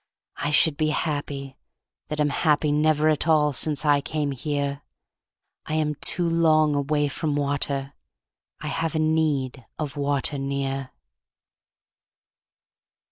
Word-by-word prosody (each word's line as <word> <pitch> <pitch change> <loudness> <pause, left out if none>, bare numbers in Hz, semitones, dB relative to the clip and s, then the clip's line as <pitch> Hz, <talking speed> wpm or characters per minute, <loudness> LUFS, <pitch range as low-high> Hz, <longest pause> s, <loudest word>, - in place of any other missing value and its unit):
I 145 - -2
should 150 0 +4
be 155 0 +1
happy, 145 -3 -3 0.5
that 150 - -4
am 150 -1 +2
happy 150 0 +2
Never 155 +1 +2
at 155 +1 +1
all 150 -2 +3
since 150 +3 +1
I 145 -1 +4
came 150 -1 -2
here. 140 +1 -3 0.9
I 155 - -2
am 155 -1 0
too 170 +4 +1
long 155 -2 +3
away 145 +1 0
from 145 +1 -2
water. 140 -1 -1 0.7
I - - -5
have 165 -1 -2
a - - +1
need 155 -5 0
of 150 -2 -4
water 140 0 0
near. 135 -1 -3
145 Hz, 130 wpm, -24 LUFS, 140-155 Hz, 0.9 s, should